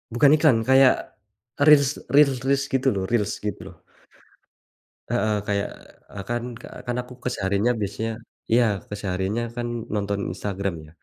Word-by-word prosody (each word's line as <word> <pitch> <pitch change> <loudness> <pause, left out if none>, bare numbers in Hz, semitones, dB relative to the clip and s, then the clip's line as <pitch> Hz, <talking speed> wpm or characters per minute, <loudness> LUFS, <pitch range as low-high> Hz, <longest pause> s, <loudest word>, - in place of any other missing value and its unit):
Bukan 140 +6 +5
iklan, 135 -8 +3
kayak 130 0 +4 0.4
Reels 145 -1 +4
Reels 140 -2 +4
Reels 140 +1 +1
gitu 135 0 +1
loh 95 -2 -2
Reels 105 -2 0
gitu 95 -2 -6
loh. 85 - -23 1.3
Heeh, 105 +1 +1
kayak 100 -1 0 0.4
a - - -10
kan 120 0 -1 0.4
kan 120 -1 -2
aku 125 +1 -12
kesehariannya 100 -1 0
biasanya 105 +3 -3 0.4
iya, 120 +2 +5 0.3
kesehariannya 100 +2 -2
kan 120 0 -3 0.3
nonton 100 -1 -1
Instagram 100 0 -3
ya? - - -16
115 Hz, 135 wpm, -24 LUFS, 100-130 Hz, 1.3 s, Bukan